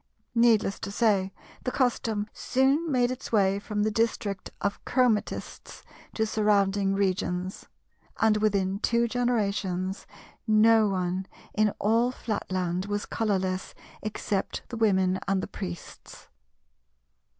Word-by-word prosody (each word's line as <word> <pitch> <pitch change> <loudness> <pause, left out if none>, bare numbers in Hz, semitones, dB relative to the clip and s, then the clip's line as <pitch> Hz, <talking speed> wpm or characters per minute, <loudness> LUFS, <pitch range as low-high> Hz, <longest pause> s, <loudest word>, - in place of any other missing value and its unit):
Needless 230 -4 +3
to - - -5
say, 200 -3 +2 0.3
the - - 0
custom 225 -5 0
soon 275 +5 +1
made 250 -2 +2
its 255 - -6
way 200 -3 +3
from 210 0 -2
the 215 - +1
district 215 -3 -1
of 200 0 -2
Chromatistes 245 -5 -1 0.3
to 220 - +1
surrounding 200 -2 +2
regions; 185 -1 -1 0.5
and 220 -1 +4
within 200 -2 +1
two 235 +2 +2
generations 200 -6 -1 0.4
no 220 0 +5
one 185 -1 -1 0.3
in 215 0 +3
all 230 +4 +2
Flatland 185 -6 -2
was 205 +1 -2
colourless 190 -4 -1 0.3
except 210 -2 -3
the 240 - -5
Women 190 -4 +2
and 195 0 +2
the - - -3
Priests. 85 0 -9
205 Hz, 115 wpm, -27 LUFS, 190-225 Hz, 0.5 s, no